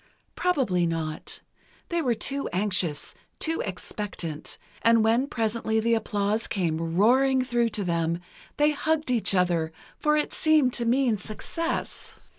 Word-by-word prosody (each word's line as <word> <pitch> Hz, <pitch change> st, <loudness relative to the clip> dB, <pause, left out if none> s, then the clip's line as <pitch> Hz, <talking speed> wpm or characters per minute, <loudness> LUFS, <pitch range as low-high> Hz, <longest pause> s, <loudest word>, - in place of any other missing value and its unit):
Probably 245 Hz, -, +1 dB
not—they 165 Hz, -, -5 dB
were 250 Hz, -6 st, +1 dB
too 275 Hz, +6 st, -1 dB
anxious, 180 Hz, -6 st, 0 dB, 0.2 s
too 325 Hz, 0 st, 0 dB
expectant, 185 Hz, -4 st, -5 dB, 0.2 s
and 230 Hz, -1 st, +5 dB
when 230 Hz, +5 st, +3 dB
presently 220 Hz, -3 st, 0 dB
the 230 Hz, +1 st, +2 dB
applause 215 Hz, 0 st, 0 dB
came 165 Hz, -3 st, -1 dB
roaring 260 Hz, +6 st, +4 dB
through 240 Hz, -2 st, +1 dB
to 210 Hz, -2 st, 0 dB
them, 170 Hz, -1 st, 0 dB, 0.4 s
they 295 Hz, +1 st, +4 dB
hugged 310 Hz, -1 st, 0 dB
each 230 Hz, -5 st, +2 dB
other, 175 Hz, -3 st, +1 dB, 0.3 s
for 300 Hz, 0 st, +3 dB
it 300 Hz, -, -1 dB
seemed 305 Hz, -5 st, +3 dB
to 235 Hz, -, -1 dB
mean 240 Hz, -2 st, +2 dB
success. 330 Hz, -, -4 dB
225 Hz, 130 wpm, -26 LUFS, 180-265 Hz, 0.4 s, and